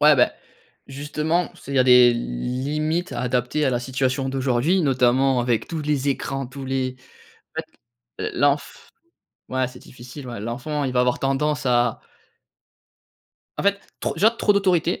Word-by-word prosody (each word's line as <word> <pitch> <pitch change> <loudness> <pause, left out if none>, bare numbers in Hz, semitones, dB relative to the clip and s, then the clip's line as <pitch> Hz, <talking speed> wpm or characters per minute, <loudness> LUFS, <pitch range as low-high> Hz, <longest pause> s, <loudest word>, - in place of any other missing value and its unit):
Ouais, 150 0 +7
beh, 125 - +4 0.6
justement, 150 +5 -1
c'est, 140 - -9
il - - -3
y - - +3
a 130 - +5
des 125 -1 +7
limites 140 - -2
à - - -3
adapter 125 +4 0
à 135 - +2
la 120 -1 0
situation 130 +1 -1
d'aujourd'hui 135 +7 +1
notamment 130 -1 +3
avec 120 -2 0
tous 160 -2 -3
les 145 -2 0
écrans, 135 -1 -2
tous 135 +2 -8
les 130 -1 -2 0.6
en - - -1 0.6
fait, - - -2
l' - - -6
l'enf 140 0 0 0.6
ouais, 130 -1 0
c'est 125 0 -12
difficile 125 +2 -11
ouais. 120 -3 -6
L'enfant 125 +7 -3
il 130 -2 -2
va 125 - +3
avoir 125 0 +1
tendance 140 +2 0
à 120 -2 +2 1.6
En - - -1
fait, 200 0 +2 0.2
trop, - - -2
déjà, 220 +3 +4
trop 225 -2 +2
d'autorité 180 -4 +1
135 Hz, 170 wpm, -23 LUFS, 125-150 Hz, 1.6 s, Ouais